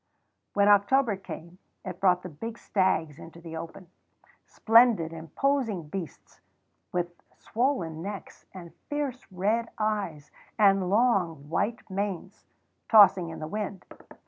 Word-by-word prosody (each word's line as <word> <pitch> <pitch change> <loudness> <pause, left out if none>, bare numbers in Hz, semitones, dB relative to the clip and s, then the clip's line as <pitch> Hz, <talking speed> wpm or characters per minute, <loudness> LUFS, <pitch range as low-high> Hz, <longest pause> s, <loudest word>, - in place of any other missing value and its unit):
When 200 0 +4
October 205 +3 +4
came 180 -2 -10 0.3
it 185 -2 -6
brought 180 -2 +3
the 180 - -6
big 225 +9 -7
stags 170 -8 0
into 165 +1 -12
the 165 -1 -9
open, 165 +2 -9 0.6
splendid, 225 -8 +4
imposing 195 - -1
beasts, 180 -2 -8 0.5
with 175 -1 -3 0.2
swollen 200 - -1
necks 200 +2 -8
and 175 -3 -11 0.2
fierce 285 -6 -4
red 215 +5 0
eyes 205 -9 -2 0.3
and 195 -3 +4
long 190 - +1
white 205 +8 -2
manes 195 0 -4 0.4
tossing 195 -5 +6
in 160 - -7
the 155 - -6
wind. 200 0 -5
195 Hz, 120 wpm, -27 LUFS, 170-215 Hz, 0.6 s, tossing